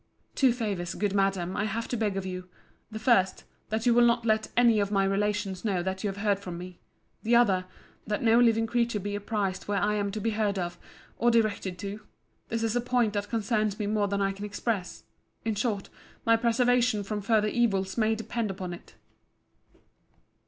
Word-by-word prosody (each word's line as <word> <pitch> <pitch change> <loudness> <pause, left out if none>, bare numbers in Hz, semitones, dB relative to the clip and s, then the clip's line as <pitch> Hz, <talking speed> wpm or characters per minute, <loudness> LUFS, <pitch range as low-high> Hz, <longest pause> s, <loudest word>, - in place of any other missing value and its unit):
Two 265 -3 +4
favours, 205 -7 -3
good 205 -2 -1
Madam, 195 -2 0
I 210 - 0
have 225 +2 -3
to - - -1
beg 210 -4 -1
of 195 - -3
you.—The 185 +4 -9
first,—that 220 0 0
you 240 - +5
will 240 +1 +5
not 235 0 +3
let 220 -1 +2
any 235 -3 +5
of 200 -1 +1
my 195 -1 +3
relations 195 -1 -1
know 190 -5 0
that 190 +2 -3
you 205 - 0
have 195 - -6
heard 200 -2 +2
from 180 -3 -7
me. 180 0 -9 0.4
The 235 +2 +2
other,—that 205 -1 0
no 230 0 +5
living 225 -2 +4
creature 235 -1 0
be 205 +1 -4
apprized 205 -2 -2
where 205 -1 0
I 205 +2 +1
am 205 -1 0
to 215 - -3
be 225 +2 0
heard 210 -2 0
of, 175 -1 -3 0.4
or 240 - +4
directed 215 -5 +1
to. 200 +2 -5 0.5
This 230 0 -1
is 225 0 0
a 245 - +2
point 245 -3 +1
that 205 0 -2
concerns 215 -2 0
me 210 - -2
more 205 0 +1
than 200 0 0
I 195 - +1
can 195 +1 -8
express.—In 210 +1 -4
short, 205 -1 -2 0.4
my 230 - +5
preservation 235 -1 +2
from 210 +1 -3
further 215 0 +2
evils 195 -5 +1
may 220 -1 +2
depend 225 0 -3
upon 185 -2 -5
it. 175 - -12
210 Hz, 190 wpm, -28 LUFS, 195-230 Hz, 0.5 s, you